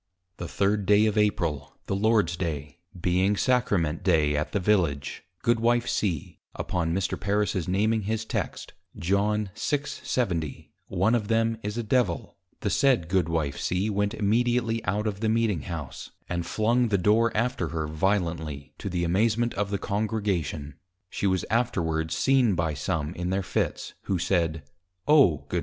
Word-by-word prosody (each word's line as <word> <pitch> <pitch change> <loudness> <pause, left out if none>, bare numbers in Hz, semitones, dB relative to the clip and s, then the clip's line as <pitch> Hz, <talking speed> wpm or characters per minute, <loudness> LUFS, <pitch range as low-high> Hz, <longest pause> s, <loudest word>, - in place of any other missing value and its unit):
The 85 - -5
3d 105 +2 +3
of 105 - 0
April, 85 -9 0
the 95 - -1
Lord's 105 -4 +2
day, 75 -3 -4 0.2
being 95 +4 +2
Sacrament 100 -12 +1
day, 80 -5 +3
at 75 +2 -1
the 100 - 0
Village, 90 -8 0 0.2
Goodw. 120 +1 +3
C. 90 -10 -2 0.2
upon 85 -3 -1
Mr. 95 +2 -1
Parris's 100 -3 0
naming 110 +4 +1
his 110 +2 -2
Text, - - -4 0.2
John 100 +3 0
6.70. 115 - -2 0.2
One 95 +5 +1
of 110 -4 +1
them 115 0 +1
is 105 +2 -4
a 120 - -1
Devil, 110 -6 0 0.3
the - - -1
said 130 - +2
Goodw. 85 -5 +1
C. 95 +8 -1
went 100 +2 0
immediately 115 +2 +1
out 105 +3 0
of 100 -2 -2
the 110 0 0
Meeting 110 -7 +1
House, 80 -6 -6 0.2
and 85 -1 -3
flung 120 +5 +2
the 105 -2 +2
Door 110 +5 +3
after 120 -6 0
her 80 0 -3
violently, 80 -4 -1
to - - -4
the 90 -1 -1
amazement 110 +7 +1
of 100 0 -1
the 100 - -1
Congregation. 100 -9 -2 0.3
She 100 - -1
was 95 -1 +1
afterwards 80 -9 0
seen 130 -7 +3
by 80 -2 0
some 75 +2 -2
in 90 0 -3
their 95 +1 0
Fits, 95 - -2
who 95 - 0
said, 85 -3 0 0.4
_O 140 - +5
+Goodw. - - -1
100 Hz, 155 wpm, -26 LUFS, 85-110 Hz, 0.4 s, O